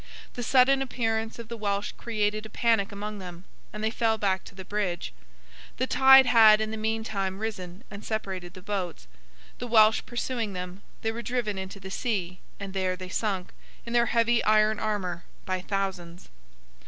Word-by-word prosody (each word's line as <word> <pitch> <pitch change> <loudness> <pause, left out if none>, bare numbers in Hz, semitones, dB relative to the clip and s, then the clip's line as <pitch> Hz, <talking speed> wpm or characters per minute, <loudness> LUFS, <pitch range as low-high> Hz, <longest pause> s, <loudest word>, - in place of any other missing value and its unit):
The 245 - -5
sudden 265 +2 +4
appearance 225 -4 -2
of 235 -2 -8
the 235 - -6
Welsh 205 -2 -2
created 215 -2 -2
a - - -19
panic 225 -2 +1
among 205 +1 -6
them, 180 -1 -9 0.3
and 215 0 -6
they 220 - +1
fell 225 -1 +1
back 195 -3 0
to - - -13
the 190 -1 -9
bridge. 180 - -2 0.6
The 255 - +1
tide 265 0 +7
had 220 -3 +7
in 220 0 -2
the - - -3
meantime 215 -3 -2
risen 195 -2 -5
and 200 +1 -8
separated 190 -5 -4
the 185 - -11
boats; 185 - -4 0.5
the 245 - -4
Welsh 220 -1 +5
pursuing 240 -3 -3
them, 180 +1 -6 0.2
they 225 - +1
were 230 +1 -5
driven 235 -5 -2
into 190 +1 -7
the 190 0 -9
sea, 185 -6 -2 0.2
and 200 -1 -6
there 185 -1 0
they 185 0 -8
sunk, 190 -2 -2 0.3
in 235 - -5
their 235 0 +4
heavy 230 0 +2
iron 215 0 +3
armour, 190 -5 -2 0.2
by 185 -1 -2
thousands. 185 -3 -4
210 Hz, 180 wpm, -27 LUFS, 190-225 Hz, 0.6 s, tide